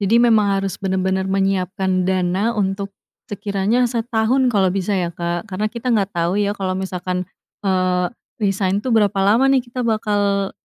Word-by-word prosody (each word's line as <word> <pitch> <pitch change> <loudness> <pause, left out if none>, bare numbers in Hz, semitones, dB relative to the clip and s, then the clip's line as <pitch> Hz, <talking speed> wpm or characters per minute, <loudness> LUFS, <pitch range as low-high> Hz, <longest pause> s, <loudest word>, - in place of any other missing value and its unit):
Jadi 205 +3 +3
memang 225 -4 +4
harus 195 -2 -3
benar-benar 190 0 0
menyiapkan 190 -1 0
dana 190 +5 0
untuk 195 0 -1 0.4
sekiranya 205 +4 0
setahun 235 +2 +1
kalau, 195 -5 +2
bisa, 195 +1 -1
ya, 175 -2 -1
Kak. 170 +3 -3
Karena 210 +1 -2
kita 240 +2 -2
nggak 200 -3 +1
tau, 170 +1 +1
ya, 205 0 0
kalau 190 -1 -2
misalkan, 185 -1 -3 0.3
eee, 185 -2 +1 0.3
resign, 195 -1 +1
tuh, 255 - -3
berapa 205 -2 +3
lama, 215 +7 +4
nih, 270 -1 +4
kita 245 0 -5
bakal 205 -3 0
195 Hz, 160 wpm, -20 LUFS, 185-220 Hz, 0.4 s, memang